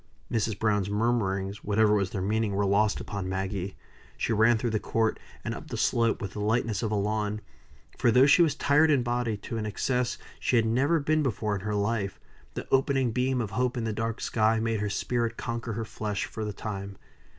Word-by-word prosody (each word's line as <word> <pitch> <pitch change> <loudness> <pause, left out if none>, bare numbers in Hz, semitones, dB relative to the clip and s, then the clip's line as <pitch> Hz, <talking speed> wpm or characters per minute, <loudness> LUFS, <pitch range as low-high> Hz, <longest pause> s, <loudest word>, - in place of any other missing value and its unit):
Mrs. 110 -2 0
Browne's 105 -2 +1
murmurings, 100 -3 0
whatever 105 +1 +3
was 100 -3 +1
their 95 -2 -3
meaning, 105 0 0
were 100 +1 +1
lost 100 +2 +2
upon 95 -2 -4
Maggie. 95 0 -3 0.4
She 115 - 0
ran 110 +2 +4
through 115 +1 -1
the 110 - +1
court, 110 +1 0 0.3
and - - -2
up - - -8
the - - -5
slope, 115 -2 +1
with 100 - -5
the - - -6
lightness 110 0 0
of 110 - -1
a - - +1
lawn; 105 +1 -1 0.6
for 120 - +4
though 125 +4 +6
she 145 +5 +6
was 160 -4 +3
tired 150 +3 +4
in 140 -5 +3
body 120 -2 -1
to 115 +3 -6
an 105 - -3
excess 125 +4 -1 0.2
she - - +1
had 115 -1 +4
never 135 +9 +2
been 155 +2 +1
before 110 -6 -1
in 100 - -2
her 105 +1 -2
life, 100 -1 -1 0.4
the - - -5
opening 135 -2 +2
beam 125 +1 0
of 110 -3 -4
hope 125 +1 0
in 120 - -1
the 110 -1 -1
dark 115 +1 -3
sky 110 0 +2
made 115 -1 0
her 105 0 -1
spirit 115 +3 -1
conquer 115 -1 -4
her 110 +1 -3
flesh 105 -2 -3
for 110 - -6
the 105 - -2
time. 100 -1 -6
110 Hz, 215 wpm, -28 LUFS, 105-120 Hz, 0.6 s, though